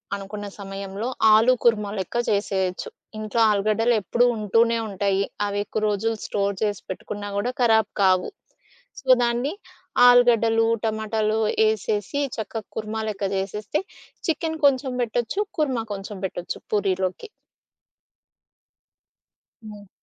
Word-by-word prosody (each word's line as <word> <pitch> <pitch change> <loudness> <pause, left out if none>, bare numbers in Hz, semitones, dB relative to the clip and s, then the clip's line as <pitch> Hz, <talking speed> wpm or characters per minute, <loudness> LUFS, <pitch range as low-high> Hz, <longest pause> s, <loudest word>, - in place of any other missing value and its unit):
అనుకున్న 205 +1 -7
సమయంలో, 195 +2 -5 0.3
ఆలు 225 +4 +6
కూర్మ 220 -3 +3
లెక్క 190 +4 -5
చేసేయొచ్చు. 190 -3 -1 0.3
ఇంట్లో 215 +2 -1
ఆలుగడ్డలు 215 +3 +2
ఎప్పుడూ 235 +6 +2
ఉంటూనే 230 +2 +2
ఉంటాయి. 195 0 0 0.2
అవి 205 0 -2
ఎక్కు 215 - -3
రోజులు 220 +2 0
స్టోర్ 200 -1 -1
చేసి 205 -2 -1
పెట్టుకున్నా 205 +2 -6
గూడా 240 +5 0
ఖరాబ్ 220 -3 +4
కావు. 185 -1 +3 0.7
సో, 270 - -24 0.2
దాన్ని 240 +5 0 0.5
ఆలుగడ్డలు, 230 -2 +5 0.2
టమాటాలు, 220 0 0 0.2
యేసేసి 215 +4 0 0.2
చెక్క 220 0 -4
కుర్మా 220 0 -3
లెక్క 200 -1 -3
జేసేస్తే, 205 - -2 0.5
చికెను 320 0 -1
కొంచెం 265 -1 0
బెట్టొచ్చు, 240 - -1 0.2
కుర్మా 260 -7 0
కొంచెం 200 +1 -7
బెట్టొచ్చు 175 -1 -5
పూరీలోకి. 190 - -1 2.4
హ్మ్. 205 -2 -11
215 Hz, 110 wpm, -24 LUFS, 200-230 Hz, 2.4 s, ఆలు